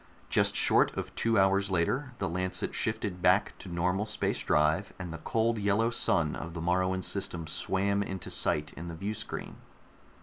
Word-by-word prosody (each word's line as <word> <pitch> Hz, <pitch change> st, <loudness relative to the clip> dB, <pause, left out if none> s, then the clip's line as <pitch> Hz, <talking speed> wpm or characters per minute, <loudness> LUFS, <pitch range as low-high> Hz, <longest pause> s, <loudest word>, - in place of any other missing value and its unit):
Just -, -, +3 dB
short -, -, +3 dB
of -, -, -4 dB
two 115 Hz, 0 st, +1 dB
hours 100 Hz, +1 st, +3 dB
later, 125 Hz, -, 0 dB
the -, -, -2 dB
Lancet 90 Hz, +2 st, -2 dB
shifted 90 Hz, -3 st, -2 dB
back 90 Hz, +3 st, +3 dB
to 95 Hz, -, -9 dB
normal 90 Hz, +4 st, 0 dB
space 110 Hz, -, -1 dB
drive, 75 Hz, +6 st, +1 dB
and 90 Hz, -3 st, -6 dB
the 80 Hz, -, -7 dB
cold 115 Hz, +3 st, 0 dB
yellow 105 Hz, +3 st, +2 dB
sun 80 Hz, -8 st, +2 dB
of 80 Hz, +1 st, -7 dB
the -, -, -4 dB
Moruan 95 Hz, +2 st, 0 dB
system 90 Hz, -4 st, -2 dB
swam 100 Hz, +5 st, 0 dB
into 95 Hz, -2 st, -5 dB
sight 75 Hz, 0 st, +2 dB
in 85 Hz, -, -8 dB
the 85 Hz, -, -6 dB
viewscreen. 100 Hz, +5 st, -5 dB
95 Hz, 170 wpm, -30 LUFS, 85-100 Hz, -, Just